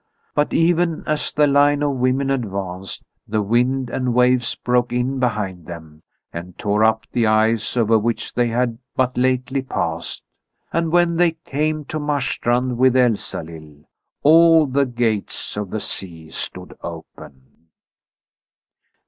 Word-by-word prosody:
But 150 Hz, 0 st, +1 dB
even 170 Hz, -1 st, +1 dB
as 155 Hz, -1 st, -1 dB
the 150 Hz, -, +3 dB
line 145 Hz, +1 st, +3 dB
of 145 Hz, -, +1 dB
women 130 Hz, +2 st, +1 dB
advanced, 95 Hz, -7 st, -4 dB, 0.2 s
the 105 Hz, 0 st, 0 dB
wind 125 Hz, +4 st, +1 dB
and 125 Hz, -2 st, -1 dB
waves 125 Hz, -1 st, +3 dB
broke 125 Hz, 0 st, 0 dB
in 125 Hz, +2 st, -1 dB
behind 100 Hz, -8 st, -2 dB
them 80 Hz, -3 st, -10 dB, 0.3 s
and 85 Hz, +1 st, -8 dB
tore 105 Hz, +1 st, +1 dB
up 110 Hz, 0 st, +2 dB
the 115 Hz, -2 st, +1 dB
ice 110 Hz, +2 st, +2 dB
over 115 Hz, -1 st, +3 dB
which 115 Hz, +2 st, -2 dB
they 120 Hz, -1 st, +1 dB
had 120 Hz, 0 st, -1 dB, 0.2 s
but 130 Hz, -1 st, 0 dB
lately 130 Hz, +1 st, 0 dB
passed; 85 Hz, -10 st, -3 dB, 0.5 s
and 165 Hz, -1 st, 0 dB
when 175 Hz, -1 st, +3 dB
they 175 Hz, -1 st, +3 dB
came 155 Hz, +1 st, -1 dB
to 155 Hz, -, -4 dB
Marstrand 130 Hz, -4 st, -1 dB
with 130 Hz, 0 st, +4 dB
Elsalill, 80 Hz, -, -1 dB, 0.4 s
all 165 Hz, +1 st, +6 dB
the 140 Hz, 0 st, +1 dB
gates 115 Hz, -4 st, -2 dB
of 105 Hz, -2 st, -4 dB
the 110 Hz, -, -3 dB
sea 80 Hz, -6 st, -3 dB
stood -, -, -6 dB
open. 65 Hz, +5 st, -11 dB
125 Hz, 140 wpm, -20 LUFS, 105-140 Hz, 0.5 s, all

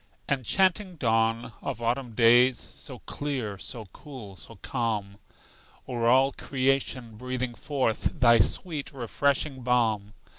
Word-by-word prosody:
Enchanting 185 Hz, -, +1 dB
dawn 115 Hz, -2 st, +1 dB
of -, -, -4 dB
autumn 120 Hz, 0 st, -2 dB
days, 120 Hz, +2 st, +6 dB
So -, -, -7 dB
clear, 125 Hz, -9 st, -3 dB
so 115 Hz, 0 st, -5 dB
cool, 125 Hz, -10 st, -10 dB
so 115 Hz, -, -8 dB
calm, 105 Hz, -3 st, -3 dB, 0.7 s
O'er 120 Hz, -2 st, -1 dB
all 130 Hz, +3 st, +5 dB
creation 130 Hz, -5 st, -1 dB
breathing 125 Hz, 0 st, -3 dB
forth 135 Hz, +2 st, -1 dB
Thy 115 Hz, -3 st, +6 dB
sweet 155 Hz, -, 0 dB
refreshing 135 Hz, +1 st, -1 dB
balm! 110 Hz, -4 st, +1 dB
125 Hz, 115 wpm, -27 LUFS, 115-135 Hz, 0.7 s, days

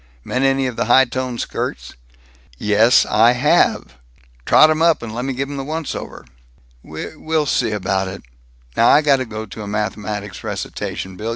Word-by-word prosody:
Met 125 Hz, -, -2 dB
any 135 Hz, 0 st, +2 dB
of 125 Hz, -3 st, -4 dB
the -, -, 0 dB
high 130 Hz, +3 st, +5 dB
toned 125 Hz, -1 st, -4 dB
skirts?" -, -, -5 dB, 0.6 s
"Yes 105 Hz, -, +4 dB
I 115 Hz, +3 st, +4 dB
have!" 125 Hz, -, +1 dB, 0.5 s
"Trot 155 Hz, -, +6 dB
'em 155 Hz, 0 st, -1 dB
up 165 Hz, -6 st, +3 dB
and 110 Hz, -2 st, -6 dB
lemme 125 Hz, +4 st, -3 dB
give 135 Hz, +2 st, -3 dB
'em 140 Hz, 0 st, -6 dB
the 135 Hz, -, -4 dB
once 155 Hz, +1 st, -4 dB
over." -, -, -8 dB, 0.6 s
"We 80 Hz, -, -8 dB
we'll 155 Hz, 0 st, -1 dB
see 125 Hz, -4 st, 0 dB
about 95 Hz, -2 st, -1 dB
it. 95 Hz, +1 st, -8 dB, 0.5 s
Now 115 Hz, -, +4 dB
I 150 Hz, -, +5 dB
got 140 Hz, -2 st, +4 dB
to 130 Hz, -, -3 dB
go 110 Hz, -1 st, -6 dB
to 110 Hz, +1 st, -10 dB
a 105 Hz, -, -7 dB
mathematics 105 Hz, -1 st, -4 dB
recitation, 95 Hz, -1 st, -5 dB
Bill. 110 Hz, +3 st, -4 dB
120 Hz, 185 wpm, -19 LUFS, 105-135 Hz, 0.6 s, Trot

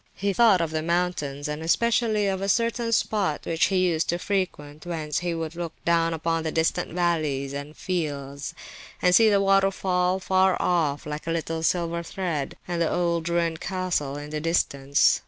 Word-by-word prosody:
He 200 Hz, 0 st, -1 dB
thought 215 Hz, -5 st, +5 dB
of 165 Hz, -2 st, -1 dB
the 155 Hz, 0 st, -1 dB
mountains—and 155 Hz, -4 st, -2 dB
especially 220 Hz, +4 st, +2 dB
of 190 Hz, -1 st, -1 dB
a 195 Hz, -, -1 dB
certain 230 Hz, +2 st, +1 dB
spot 205 Hz, -8 st, 0 dB
which 165 Hz, -1 st, +2 dB
he 185 Hz, -2 st, +2 dB
used 165 Hz, -2 st, 0 dB
to 175 Hz, -, +1 dB
frequent, 175 Hz, -7 st, -3 dB
whence 160 Hz, -4 st, -3 dB
he 175 Hz, -1 st, -2 dB
would 165 Hz, 0 st, -4 dB
look 170 Hz, -2 st, -4 dB
down 165 Hz, -1 st, +3 dB
upon 165 Hz, 0 st, -1 dB
the 160 Hz, -1 st, -2 dB
distant 160 Hz, +1 st, 0 dB
valleys 155 Hz, -6 st, 0 dB
and 145 Hz, +2 st, -7 dB
fields, 140 Hz, -6 st, -4 dB, 0.4 s
and 180 Hz, -, +3 dB
see 220 Hz, +3 st, +7 dB
the 200 Hz, -1 st, +4 dB
waterfall, 195 Hz, -2 st, +2 dB
far 190 Hz, 0 st, +2 dB
off, 155 Hz, -5 st, 0 dB
like 150 Hz, +2 st, -6 dB
a -, -, 0 dB
little 165 Hz, 0 st, -2 dB
silver 170 Hz, 0 st, 0 dB
thread, 170 Hz, -5 st, -3 dB
and 175 Hz, -1 st, -2 dB
the 165 Hz, -, +1 dB
old 170 Hz, -1 st, 0 dB
ruined 170 Hz, -1 st, 0 dB
castle 180 Hz, -7 st, -2 dB
in 145 Hz, +1 st, -8 dB
the 155 Hz, 0 st, -3 dB
distance. 140 Hz, -4 st, +2 dB
170 Hz, 175 wpm, -25 LUFS, 155-185 Hz, 0.4 s, see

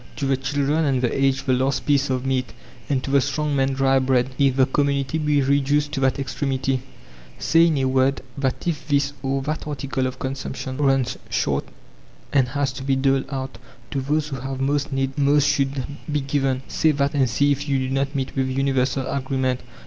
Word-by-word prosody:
To 140 Hz, -, -3 dB
the 135 Hz, 0 st, +2 dB
children 145 Hz, +4 st, 0 dB
and 135 Hz, -3 st, +1 dB
the 125 Hz, -2 st, 0 dB
aged 135 Hz, 0 st, +1 dB
the 130 Hz, -, +2 dB
last 130 Hz, +1 st, 0 dB
piece 140 Hz, -1 st, +2 dB
of 130 Hz, 0 st, -1 dB
meat, 130 Hz, -3 st, -1 dB, 0.4 s
and 135 Hz, -3 st, 0 dB
to 135 Hz, -, -4 dB
the 140 Hz, -1 st, +5 dB
strong 145 Hz, +2 st, -1 dB
man 135 Hz, 0 st, +1 dB
dry 135 Hz, 0 st, +3 dB
bread, 130 Hz, -1 st, +1 dB
if 135 Hz, -2 st, +3 dB
the 130 Hz, -1 st, +5 dB
community 140 Hz, +2 st, 0 dB
be 150 Hz, -2 st, +2 dB
reduced 145 Hz, +2 st, +2 dB
to 145 Hz, -, -2 dB
that 135 Hz, -1 st, +2 dB
extremity. 135 Hz, -1 st, -1 dB, 0.6 s
Say, 165 Hz, +1 st, +4 dB
in 160 Hz, -3 st, +1 dB
a 135 Hz, -, +1 dB
word, 130 Hz, +1 st, +2 dB
that 135 Hz, -2 st, -2 dB
if 150 Hz, -4 st, -2 dB
this 145 Hz, -1 st, +1 dB
or 135 Hz, 0 st, -1 dB
that 155 Hz, +2 st, -3 dB
article 135 Hz, -2 st, -2 dB
of 130 Hz, -, -6 dB
consumption 130 Hz, 0 st, -5 dB
runs 135 Hz, -3 st, +1 dB
short, -, -, 0 dB, 0.7 s
and 130 Hz, -3 st, +4 dB
has 140 Hz, 0 st, -1 dB
to 135 Hz, 0 st, -7 dB
be 135 Hz, 0 st, +1 dB
doled 135 Hz, 0 st, +2 dB
out, 135 Hz, -2 st, -5 dB, 0.3 s
to 140 Hz, -, -1 dB
those 150 Hz, +3 st, 0 dB
who 135 Hz, -, -4 dB
have 135 Hz, +1 st, -5 dB
most 140 Hz, +2 st, 0 dB
need 135 Hz, +1 st, -1 dB
most 145 Hz, 0 st, +4 dB
should 135 Hz, -2 st, 0 dB, 0.3 s
be 150 Hz, -1 st, +1 dB
given. 135 Hz, -1 st, 0 dB
Say 160 Hz, -, +2 dB
that 140 Hz, 0 st, 0 dB
and 135 Hz, -4 st, +2 dB
see 145 Hz, +5 st, +2 dB
if 140 Hz, +1 st, -2 dB
you 135 Hz, -, +2 dB
do -, -, -5 dB
not 135 Hz, +2 st, -1 dB
meet 135 Hz, -1 st, -3 dB
with 130 Hz, -1 st, 0 dB
universal 135 Hz, 0 st, 0 dB
agreement. 130 Hz, -2 st, -1 dB
135 Hz, 205 wpm, -23 LUFS, 130-140 Hz, 0.7 s, the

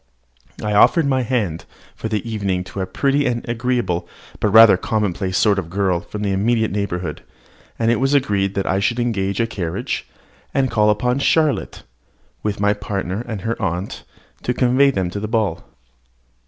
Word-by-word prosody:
I 105 Hz, 0 st, -1 dB
offered 160 Hz, -, +5 dB
my 130 Hz, -2 st, +1 dB
hand 110 Hz, -10 st, -2 dB, 0.3 s
for -, -, -4 dB
the 110 Hz, 0 st, -2 dB
evening 100 Hz, -5 st, -1 dB
to 95 Hz, +1 st, -6 dB
a 95 Hz, -, -2 dB
pretty 140 Hz, +7 st, +1 dB
and 120 Hz, -1 st, -2 dB
agreeable, 120 Hz, -6 st, -1 dB, 0.3 s
but 105 Hz, -, +1 dB
rather 110 Hz, -1 st, +8 dB
commonplace, 95 Hz, -2 st, -1 dB
sort 100 Hz, -2 st, +3 dB
of 80 Hz, -, -6 dB
girl 95 Hz, -1 st, 0 dB
from 105 Hz, +4 st, -7 dB
the 100 Hz, -, 0 dB
immediate 110 Hz, +3 st, +1 dB
neighbourhood; 90 Hz, -5 st, -3 dB, 0.6 s
and 115 Hz, 0 st, +2 dB
it 115 Hz, -, +1 dB
was 135 Hz, +2 st, +2 dB
agreed 100 Hz, -8 st, +1 dB
that 100 Hz, -, -1 dB
I 95 Hz, -, +1 dB
should 115 Hz, +4 st, 0 dB
engage 100 Hz, -5 st, -1 dB
a 115 Hz, -, +3 dB
carriage, 95 Hz, -7 st, -4 dB, 0.5 s
and 130 Hz, -3 st, +2 dB
call 105 Hz, -2 st, +3 dB
upon 125 Hz, +5 st, +1 dB
Charlotte, 155 Hz, +1 st, +1 dB, 0.6 s
with 105 Hz, -2 st, -2 dB
my 105 Hz, 0 st, +3 dB
partner 100 Hz, 0 st, -4 dB
and 110 Hz, -5 st, -4 dB
her 115 Hz, +4 st, -3 dB
aunt, 90 Hz, 0 st, -3 dB, 0.4 s
to 125 Hz, -, -1 dB
convey 130 Hz, +3 st, +4 dB
them 95 Hz, -9 st, -1 dB
to 100 Hz, -, -4 dB
the 110 Hz, -, -3 dB
ball. 110 Hz, -7 st, -1 dB
105 Hz, 175 wpm, -20 LUFS, 95-120 Hz, 0.6 s, rather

